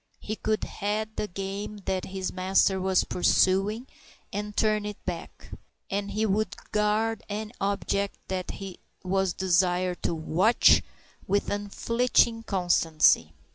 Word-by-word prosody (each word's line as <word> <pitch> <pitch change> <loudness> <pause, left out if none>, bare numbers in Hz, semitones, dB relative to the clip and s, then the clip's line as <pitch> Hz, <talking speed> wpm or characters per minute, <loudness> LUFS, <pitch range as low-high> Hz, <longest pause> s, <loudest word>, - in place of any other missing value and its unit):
He 215 - -4
could 215 0 -1
head 215 +1 -3
the 210 - -2
game 195 +2 -5
that 190 -1 -1
his 190 -1 -4
master 190 +1 +2
was 190 0 +2
pursuing 195 +6 +2 0.5
and 210 +1 -4
turn 215 -1 +2
it 210 0 -5
back; 175 -2 -7 0.4
and 200 +1 -1
he 215 +2 0
would 215 +1 0 0.2
guard 215 +1 +1
any 210 +1 -4
object 200 0 -1 0.4
he 195 -2 -8 0.2
was 190 0 +1
desired 180 -1 +1
to 170 - -1
"watch" 175 +8 +4 0.5
with 200 +2 0
unflinching 230 +3 +1
constancy. 165 - +2
200 Hz, 125 wpm, -27 LUFS, 185-210 Hz, 0.5 s, watch